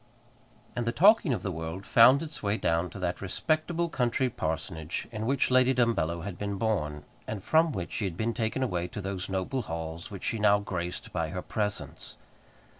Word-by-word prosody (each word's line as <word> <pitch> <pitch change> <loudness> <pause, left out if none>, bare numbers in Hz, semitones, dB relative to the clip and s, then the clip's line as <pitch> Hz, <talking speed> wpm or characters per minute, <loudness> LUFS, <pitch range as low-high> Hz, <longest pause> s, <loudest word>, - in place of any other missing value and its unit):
And 120 -1 -2
the - - +3
talking 195 - +5
of 120 - -1
the 95 - -1
world 80 +3 -5
found 130 +6 +7
its 155 -1 -8
way 105 +1 0
down 85 -1 +1
to - - -10
that 90 -2 -2
respectable 155 - 0
country 125 -3 0
parsonage 80 0 -3
in 110 0 -3
which 135 0 +2
Lady 130 +1 +5
Dumbello 100 -9 +1
had 100 -2 -6
been 100 -1 -2
born, 75 -10 -1 0.2
and 105 -3 -4
from 160 0 +4
which 90 -9 -4
she 105 - -2
had 90 -3 -4
been 115 +3 0
taken 115 +4 -1
away 90 -8 -1
to 105 - -7
those 95 -2 -4
noble 95 +8 -1
halls 80 -4 -5
which 100 -3 -8
she 115 - -1
now 105 -1 +5
graced 90 -3 -4
by 80 -3 -1
her 90 +1 -4
presence. 105 -1 -4
100 Hz, 190 wpm, -29 LUFS, 90-125 Hz, 0.2 s, found